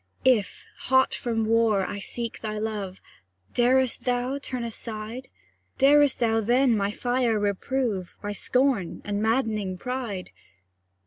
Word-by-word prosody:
If, 240 -7 +2 0.2
hot 260 0 +4
from 225 -3 -1
war, 220 -3 +3
I 205 - -5
seek 235 +3 -5
thy 215 -1 -3
love, 210 -3 -4 0.5
Darest 255 +1 +2
thou 250 +2 0
turn 255 -3 -4
aside? 230 +2 -5 0.5
Darest 285 0 +5
thou 225 -1 +2
then 245 +2 +3
my 200 -1 0
fire 245 +1 0
reprove, 205 -1 -1
By 205 0 -4
scorn, 250 -4 0
and 205 0 -2
maddening 220 -5 0
pride? 235 -5 -4
230 Hz, 125 wpm, -26 LUFS, 210-255 Hz, 0.5 s, Darest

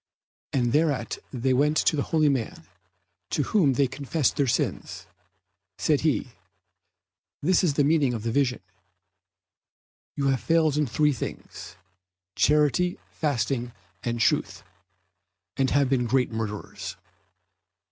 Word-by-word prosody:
And 120 -3 0
thereat 145 -7 0
they 130 0 0
went 150 +4 +2
to 150 - +2
a - - +2
holy 155 +1 +2
man 130 -6 -1 0.7
to 145 - 0
whom 155 -5 +2
they 140 +2 +2
confessed 140 +3 -1
their 140 - +1
sins. 115 - -2 0.7
Said - - +1
he, - - 0 1.1
"This 180 +4 +3
is 155 -6 +1
the 145 - +3
meaning 145 -4 +2
of 110 - -5
the 115 - -1
vision: 125 -1 0 1.5
you 140 -1 0
have 130 -2 0
failed 160 -3 +2
in 150 -1 +1
three 150 +4 +2
things, 125 - -7 0.6
charity, 150 +4 +2
fasting, 125 -4 -1 0.3
and 120 -1 -3
truth, - - 0 0.9
and 135 -1 +1
have 140 -1 +2
been 125 -2 +1
great 125 +1 +1
murderers." 110 -2 -5
140 Hz, 125 wpm, -26 LUFS, 125-150 Hz, 1.5 s, This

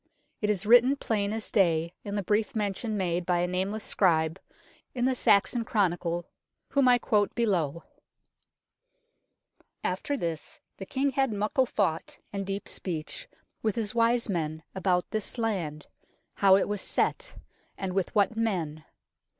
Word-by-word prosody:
It 210 - 0
is 210 -1 0
written 245 +5 +6
plain 210 -6 -1
as 220 0 -4
day 170 -4 +2
in 200 0 -4
the 205 - -1
brief 215 +7 0
mention 210 +1 -1
made 180 -2 0
by 175 0 +1
a 175 - +1
nameless 190 +4 -2
scribe 160 -2 +2 0.6
in 245 0 0
the 260 - +3
Saxon 230 0 +3
Chronicle, 175 -5 0 0.4
whom 275 -2 +3
I 245 -1 +6
quote 210 -3 +1
below 175 - 0 1.0
" - - -42
After 285 -2 -1
this 165 - -4 0.2
the 195 - -8
King 275 +1 0
had 270 -2 +1
muckle 215 +6 +1
thought 165 -8 -1 0.2
and 195 -1 -3
deep 195 +1 -4
speech 180 - -4 0.3
with 220 -1 0
his 220 -3 -1
wise 235 0 +2
men 160 -5 -2
about 185 -2 +1
this 215 +2 -1
land, 180 -10 -2 0.5
how 195 -1 +5
it 195 - +2
was 205 -2 -2
set, - - 0 0.4
and 190 -1 -3
with 190 +1 -1
what 205 +1 +3
men. 170 -9 -2
200 Hz, 150 wpm, -28 LUFS, 180-230 Hz, 1.0 s, written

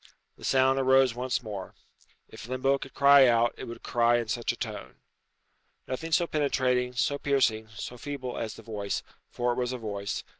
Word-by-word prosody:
The - - -17
sound 135 0 +3
arose 130 -1 +4
once 125 +1 -2
more. 105 -4 -7 0.5
If - - -11
limbo 135 +2 +1
could 135 - -10
cry 140 -1 +7
out, 120 0 +3
it - - -8
would 115 - -9
cry 120 0 +3
in 120 -2 -3
such 120 +1 -1
a - - -7
tone. 65 +1 -6 0.9
Nothing 160 +6 -4
so 170 +2 +3
penetrating, 130 -5 0
so 135 +4 0
piercing, 120 -7 +1
so 125 +2 -7
feeble 140 -3 -5
as 110 - -4
the 115 - -13
voice 105 -2 -4 0.3
for 120 0 -1
it 120 - -3
was 125 0 -1
a - - -3
voice. 100 -3 -4
125 Hz, 185 wpm, -28 LUFS, 115-135 Hz, 0.9 s, cry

